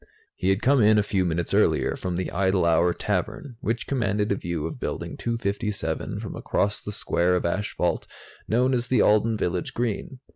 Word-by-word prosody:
He 95 Hz, -, 0 dB
had 95 Hz, +3 st, +1 dB
come 135 Hz, -1 st, +4 dB
in, 105 Hz, 0 st, +5 dB
a 105 Hz, -, +4 dB
few 100 Hz, -2 st, 0 dB
minutes 85 Hz, 0 st, -1 dB
earlier, -, -, +3 dB
from 90 Hz, -1 st, -3 dB
the 90 Hz, +1 st, -2 dB
Idle 95 Hz, -1 st, +2 dB
Hour 85 Hz, +1 st, +4 dB
Tavern, 125 Hz, +7 st, -3 dB
which 115 Hz, -4 st, -1 dB
commanded 105 Hz, -6 st, 0 dB
a -, -, +3 dB
view 85 Hz, -4 st, -3 dB
of 80 Hz, -, -5 dB
Building -, -, -4 dB
257 105 Hz, -7 st, -2 dB
from -, -, -6 dB
across 100 Hz, +1 st, -1 dB
the 105 Hz, -, -5 dB
square 90 Hz, -3 st, +1 dB
of 90 Hz, -, -1 dB
asphalt 90 Hz, -1 st, -1 dB, 0.4 s
known 125 Hz, +4 st, +2 dB
as 120 Hz, -1 st, 0 dB
the 130 Hz, -, +3 dB
Alden 110 Hz, +1 st, +3 dB
Village 90 Hz, -2 st, -2 dB
Green. 120 Hz, +2 st, -2 dB
100 Hz, 185 wpm, -25 LUFS, 90-115 Hz, 0.4 s, in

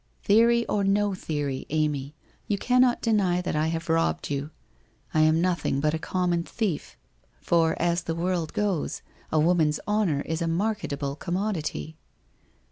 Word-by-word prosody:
' -, -, -39 dB
Theory 235 Hz, +3 st, +4 dB
or 205 Hz, -, 0 dB
no 200 Hz, +1 st, +2 dB
theory, 145 Hz, -7 st, -3 dB
Amy, 150 Hz, -2 st, -1 dB, 0.3 s
you 205 Hz, -, 0 dB
cannot 250 Hz, +3 st, +3 dB
deny 200 Hz, -6 st, +2 dB
that 180 Hz, -, -2 dB
I 155 Hz, +1 st, +1 dB
have 165 Hz, +1 st, -3 dB
robbed 160 Hz, -, +1 dB
vou. 140 Hz, +1 st, -2 dB, 0.6 s
I 155 Hz, -, +2 dB
am 155 Hz, +1 st, +4 dB
nothing: 175 Hz, -6 st, 0 dB
but 150 Hz, +2 st, +1 dB
a 160 Hz, -, -1 dB
common 175 Hz, 0 st, 0 dB
thief. 170 Hz, -, -3 dB, 0.4 s
For 165 Hz, -1 st, +2 dB
as 170 Hz, +1 st, +1 dB
the 165 Hz, -1 st, -3 dB
world 170 Hz, -1 st, -1 dB
goes, 200 Hz, -7 st, -1 dB, 0.3 s
a 155 Hz, -, +3 dB
woman's 155 Hz, -2 st, +3 dB
honour 205 Hz, -9 st, +1 dB
is 160 Hz, +3 st, -3 dB
a 165 Hz, -, 0 dB
marketable 165 Hz, -7 st, -2 dB
commodity.' 170 Hz, -2 st, -3 dB
170 Hz, 155 wpm, -26 LUFS, 155-200 Hz, 0.6 s, Theory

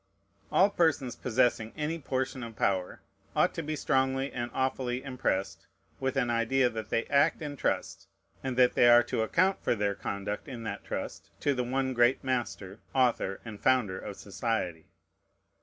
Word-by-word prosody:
All 200 Hz, +2 st, +5 dB
persons 145 Hz, -9 st, +1 dB
possessing 120 Hz, -2 st, +1 dB
any 155 Hz, +2 st, -2 dB
portion 130 Hz, -1 st, -2 dB
of 115 Hz, -2 st, -7 dB
power 95 Hz, -3 st, -1 dB, 0.3 s
ought -, -, +3 dB
to -, -, -3 dB
be 155 Hz, +1 st, -3 dB
strongly 135 Hz, -1 st, +1 dB
and 120 Hz, -1 st, -3 dB
awfully 130 Hz, -1 st, -1 dB
impressed 125 Hz, -8 st, -2 dB, 0.3 s
with 135 Hz, 0 st, -1 dB
an 120 Hz, -3 st, +1 dB
idea 120 Hz, +2 st, +2 dB
that 110 Hz, -2 st, -6 dB
they 115 Hz, -, 0 dB
act 145 Hz, +2 st, +3 dB
in 145 Hz, -1 st, -4 dB
trust, -, -, -2 dB, 0.4 s
and 130 Hz, -2 st, -3 dB
that 125 Hz, -1 st, +5 dB
they 120 Hz, -, +6 dB
are 120 Hz, 0 st, +8 dB
to -, -, -2 dB
account 185 Hz, -, +2 dB
for -, -, +2 dB
their 100 Hz, -1 st, 0 dB
conduct 100 Hz, +3 st, -4 dB
in 125 Hz, -4 st, -7 dB
that 110 Hz, -, -5 dB
trust -, -, -5 dB
to 145 Hz, -, +2 dB
the 125 Hz, -2 st, -1 dB
one 130 Hz, +1 st, -1 dB
great 120 Hz, +1 st, +3 dB
Master, 120 Hz, -6 st, -3 dB, 0.2 s
Author, 120 Hz, -7 st, +1 dB
and 110 Hz, -3 st, -8 dB
Founder 115 Hz, -8 st, +2 dB
of 100 Hz, -2 st, -7 dB
society. 100 Hz, -6 st, -3 dB
125 Hz, 170 wpm, -29 LUFS, 110-135 Hz, 0.4 s, are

